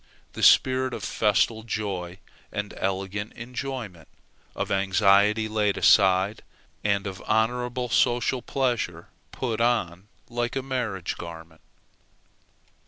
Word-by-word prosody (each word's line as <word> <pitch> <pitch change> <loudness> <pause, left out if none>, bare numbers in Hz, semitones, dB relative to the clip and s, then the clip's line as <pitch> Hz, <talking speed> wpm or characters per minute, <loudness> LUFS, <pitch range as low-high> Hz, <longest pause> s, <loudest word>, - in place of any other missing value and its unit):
the - - -7
spirit 130 0 +4
of - - -7
festal 110 +1 +1
joy 100 -5 -4 0.3
and 105 0 -4
elegant 95 +2 -3
enjoyment, 120 - -6 0.5
of - - -3
anxiety 100 +2 +3
laid 105 -2 0
aside, 95 +1 +4 0.4
and 100 -1 +1
of 95 -2 -6
honorable 125 +3 0
social 120 +1 +1
pleasure 120 - -2 0.2
put 115 -3 -3
on 105 -6 0 0.2
like 120 +1 -3
a 135 - -2
marriage 120 -9 -3
garment. 80 -1 -10
105 Hz, 105 wpm, -25 LUFS, 95-120 Hz, 0.5 s, spirit